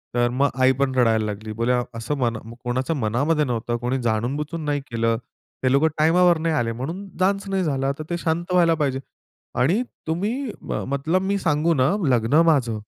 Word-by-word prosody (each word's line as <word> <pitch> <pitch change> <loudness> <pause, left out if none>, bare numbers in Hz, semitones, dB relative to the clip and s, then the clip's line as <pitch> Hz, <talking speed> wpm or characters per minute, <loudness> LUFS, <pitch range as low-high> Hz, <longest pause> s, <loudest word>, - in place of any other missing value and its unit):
तर 120 0 +3
मग 140 +3 +2
आई 130 0 +6
पण 130 -1 +1
रडायला 115 -3 +3
लागली. 105 +1 -5
बोलली 115 +3 0 0.3
असं 115 +6 -2
मन 120 -3 0 0.3
कोणाच्या 130 +6 -1
मनामध्ये 140 +6 +1
नव्हतं 120 -1 -2
कोणी 125 +3 -1
जाणूनबुजून 140 +8 -2
नाही 145 -1 0
केलं. 115 0 +1 0.5
ते 130 - +3
लोकं 140 +4 +4
टाईमावर 170 +2 +4
नाही 160 -1 0
आले. 115 -4 0
म्हणून 165 - -5
डान्स 195 +1 +1
नाही 190 -1 0
झाला. 135 -3 0
तर - - -3
ते 175 - -1
शांत 170 +1 -2
व्हायला 170 -2 +4
पाहिजे. 135 -4 -1 0.6
आणि 175 - +3 0.3
तुम्ही 215 - -2
मतलब, 150 +7 -1
मी 200 +1 0
सांगू 165 -1 +1
ना, 135 +2 +2 0.2
लग्न 125 +5 +3
माझं 120 -7 0
140 Hz, 175 wpm, -23 LUFS, 120-165 Hz, 0.6 s, आई